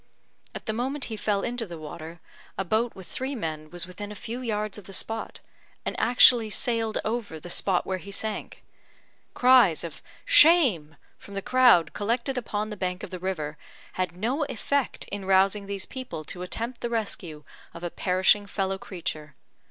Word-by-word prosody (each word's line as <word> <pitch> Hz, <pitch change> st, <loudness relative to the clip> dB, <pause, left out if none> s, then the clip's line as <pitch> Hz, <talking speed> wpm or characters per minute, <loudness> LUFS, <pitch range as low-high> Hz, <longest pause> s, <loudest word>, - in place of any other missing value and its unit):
At -, -, -7 dB
the 220 Hz, -, -1 dB
moment 265 Hz, +5 st, -2 dB
he -, -, -2 dB
fell 205 Hz, -2 st, 0 dB
into 240 Hz, -2 st, -2 dB
the 170 Hz, -2 st, -7 dB
water, 160 Hz, +2 st, -8 dB, 0.4 s
a -, -, 0 dB
boat 225 Hz, +5 st, +1 dB
with 190 Hz, -, -10 dB
three 260 Hz, +10 st, -3 dB
men 155 Hz, -7 st, -4 dB
was 175 Hz, 0 st, -3 dB
within 205 Hz, +3 st, -8 dB
a -, -, -7 dB
few 230 Hz, +4 st, -5 dB
yards 215 Hz, -3 st, -2 dB
of 200 Hz, -, -15 dB
the 195 Hz, -, -11 dB
spot, 225 Hz, 0 st, -4 dB, 0.4 s
and -, -, -2 dB
actually 235 Hz, -1 st, +6 dB
sailed 225 Hz, +1 st, 0 dB
over 220 Hz, -8 st, -2 dB
the 175 Hz, +3 st, -9 dB
spot 185 Hz, -1 st, +1 dB
where 190 Hz, -1 st, -2 dB
he 180 Hz, -, -11 dB
sank. 215 Hz, +2 st, -4 dB, 0.7 s
Cries 250 Hz, -10 st, +6 dB
of 165 Hz, -4 st, -7 dB, 0.2 s
"Shame!" 290 Hz, -, +6 dB, 0.2 s
from 200 Hz, -, -11 dB
the 195 Hz, -, -2 dB
crowd 250 Hz, -10 st, +5 dB
collected 235 Hz, +5 st, -1 dB
upon 215 Hz, -3 st, -2 dB
the 210 Hz, -, -5 dB
bank 180 Hz, 0 st, -2 dB
of -, -, -7 dB
the 185 Hz, -, -5 dB
river, 155 Hz, -5 st, -3 dB, 0.3 s
had 180 Hz, -2 st, -2 dB
no 250 Hz, -, 0 dB
effect 280 Hz, +2 st, -1 dB
in 200 Hz, -1 st, -5 dB
rousing 195 Hz, +1 st, +3 dB
these 200 Hz, -1 st, -3 dB
people 255 Hz, -11 st, -6 dB
to 180 Hz, -, -7 dB
attempt 230 Hz, +7 st, -4 dB
the 240 Hz, -, -2 dB
rescue 190 Hz, -9 st, -3 dB, 0.3 s
of 170 Hz, -, -10 dB
a 175 Hz, -, -3 dB
perishing 190 Hz, +2 st, +3 dB
fellow 195 Hz, -1 st, -1 dB
creature. 155 Hz, -7 st, -5 dB
200 Hz, 180 wpm, -27 LUFS, 180-235 Hz, 0.7 s, actually